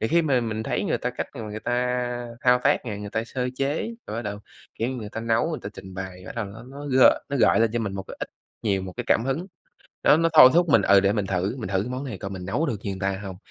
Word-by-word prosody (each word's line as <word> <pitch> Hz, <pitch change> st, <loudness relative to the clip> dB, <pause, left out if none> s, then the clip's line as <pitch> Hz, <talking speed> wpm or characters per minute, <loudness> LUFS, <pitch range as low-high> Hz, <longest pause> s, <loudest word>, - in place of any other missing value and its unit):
thì 110 Hz, -, 0 dB
khi 170 Hz, +5 st, +3 dB
mà 135 Hz, -6 st, +2 dB
mình 110 Hz, -1 st, -3 dB
thấy -, -, -1 dB
người -, -, 0 dB
ta -, -, -2 dB
cách -, -, -4 dB
mà -, -, -6 dB
người 105 Hz, 0 st, -6 dB
ta 125 Hz, 0 st, -1 dB
thao 125 Hz, 0 st, +5 dB
tác -, -, +3 dB
này, 105 Hz, -3 st, -4 dB
người 105 Hz, -1 st, -6 dB
ta 115 Hz, 0 st, -1 dB
sơ 125 Hz, +2 st, -3 dB
chế 145 Hz, +11 st, -1 dB, 0.2 s
rồi 105 Hz, -, -5 dB
bắt 115 Hz, -, -3 dB
đầu, 105 Hz, -2 st, -4 dB, 0.4 s
kiểu 115 Hz, -, -1 dB
như, 130 Hz, -, -3 dB
người 110 Hz, -3 st, -6 dB
ta 110 Hz, -, -4 dB
nấu, 115 Hz, +7 st, +1 dB
người 155 Hz, -, -3 dB
ta 100 Hz, -, -4 dB
trình 95 Hz, -2 st, -10 dB
bày, 95 Hz, -1 st, -7 dB
bắt -, -, -7 dB
đầu 115 Hz, -, -1 dB
nó 105 Hz, +3 st, -10 dB
nó 145 Hz, +1 st, -8 dB
g 130 Hz, -2 st, 0 dB, 0.3 s
nó 140 Hz, -, -1 dB
gợi 115 Hz, -, +4 dB
lên 115 Hz, -1 st, +3 dB
cho 120 Hz, -, 0 dB
mình 105 Hz, -4 st, -3 dB
một 95 Hz, -, -4 dB
cái -, -, -10 dB
ít -, -, -4 dB, 0.3 s
nhiều 100 Hz, -4 st, +1 dB
một 95 Hz, -1 st, -6 dB
cái -, -, -3 dB
cảm 115 Hz, -, +3 dB
hứng. 145 Hz, +8 st, -2 dB, 0.6 s
Đó, 150 Hz, -, +6 dB
nó 165 Hz, 0 st, +3 dB
thôi 130 Hz, -5 st, +10 dB
thúc 175 Hz, 0 st, +4 dB
mình 115 Hz, -9 st, +5 dB
ừ, 100 Hz, 0 st, +6 dB
để 100 Hz, 0 st, +2 dB
mình 105 Hz, -2 st, -1 dB
thử 95 Hz, +6 st, -1 dB
mình 110 Hz, -7 st, -5 dB
thử 95 Hz, 0 st, +1 dB
cái 120 Hz, -, -5 dB
món 130 Hz, +2 st, -4 dB
này 120 Hz, -8 st, -5 dB
coi 100 Hz, 0 st, -5 dB
mình 95 Hz, -2 st, -6 dB
nấu 155 Hz, -, 0 dB
được 120 Hz, -7 st, -1 dB
như 100 Hz, -, -3 dB
người 95 Hz, -, -6 dB
ta 95 Hz, 0 st, -1 dB
hông 95 Hz, -2 st, -6 dB
115 Hz, 310 wpm, -25 LUFS, 100-130 Hz, 0.6 s, thôi